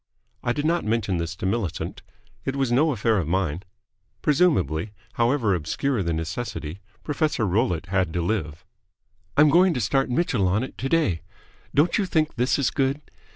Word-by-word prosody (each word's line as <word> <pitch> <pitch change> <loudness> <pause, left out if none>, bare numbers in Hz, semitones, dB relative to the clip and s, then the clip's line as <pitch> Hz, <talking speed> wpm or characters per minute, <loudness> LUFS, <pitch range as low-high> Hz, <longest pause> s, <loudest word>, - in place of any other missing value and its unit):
I 120 - +1
did 145 +4 -2
not 170 +2 +1
mention 105 -4 0
this 85 +1 -3
to 95 - -6
Millicent. 95 -3 -2 0.4
It 135 - -2
was 135 -3 0
no 150 +6 +4
affair 115 -3 +1
of 85 - -2
mine. 90 -2 0 0.6
Presumably, 110 - +2 0.2
however 115 -3 +2
obscure 100 - -1
the 85 -2 -1
necessity, 80 +1 -4 0.2
Professor 150 -6 0
Rollitt 95 -3 0
had 95 -2 0
to 90 - 0
live. 85 -6 -2 0.7
"I'm 150 +1 +7
going 175 +2 +5
to - - 0
start 135 +5 +1
Mitchell 125 - +1
on 100 +6 +1
it 130 - -7
today. 135 - +1 0.5
Don't 155 +8 +3
you 200 - 0
think 155 -3 +1
this 125 +2 +1
is 140 -4 +1
good? 135 +1 0
115 Hz, 165 wpm, -24 LUFS, 90-140 Hz, 0.7 s, I'm